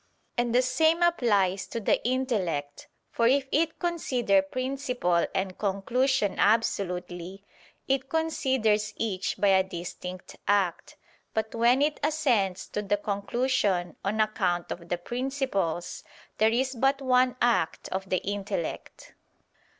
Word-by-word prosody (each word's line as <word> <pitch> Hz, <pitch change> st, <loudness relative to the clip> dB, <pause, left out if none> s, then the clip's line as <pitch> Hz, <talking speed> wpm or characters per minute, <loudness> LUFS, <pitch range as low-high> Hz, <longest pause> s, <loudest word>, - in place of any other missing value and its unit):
And 240 Hz, 0 st, 0 dB
the 250 Hz, -, +5 dB
same 320 Hz, +6 st, +3 dB
applies 205 Hz, -, +2 dB
to 230 Hz, -, -4 dB
the 210 Hz, -, +1 dB
intellect; 205 Hz, -, -1 dB, 0.2 s
for 230 Hz, -, +2 dB
if 270 Hz, +2 st, +3 dB
it 320 Hz, +1 st, +1 dB
consider 255 Hz, -, +1 dB
principle 250 Hz, -5 st, -1 dB
and 190 Hz, -1 st, -2 dB
conclusion 215 Hz, +3 st, 0 dB
absolutely, 190 Hz, -3 st, 0 dB, 0.4 s
it 270 Hz, 0 st, 0 dB
considers 260 Hz, -10 st, +1 dB
each 195 Hz, -5 st, -2 dB
by 205 Hz, -, +3 dB
a 190 Hz, -1 st, +5 dB
distinct 180 Hz, 0 st, -8 dB
act; 195 Hz, -4 st, 0 dB, 0.4 s
but 220 Hz, 0 st, -1 dB
when 240 Hz, +4 st, +4 dB
it 300 Hz, 0 st, 0 dB
assents 250 Hz, -12 st, +1 dB
to 210 Hz, -, -2 dB
the 205 Hz, 0 st, 0 dB
conclusion 200 Hz, -2 st, 0 dB
on 210 Hz, +3 st, -1 dB
account 190 Hz, -5 st, 0 dB
of 170 Hz, -1 st, -7 dB
the 175 Hz, -, 0 dB
principles, 240 Hz, -, -2 dB, 0.4 s
there 220 Hz, +1 st, +5 dB
is 260 Hz, +3 st, 0 dB
but 270 Hz, +3 st, +2 dB
one 255 Hz, -1 st, +3 dB
act 235 Hz, -9 st, +1 dB
of 190 Hz, 0 st, -4 dB
the 185 Hz, -, 0 dB
intellect. 205 Hz, -, -4 dB
220 Hz, 125 wpm, -27 LUFS, 190-260 Hz, 0.4 s, the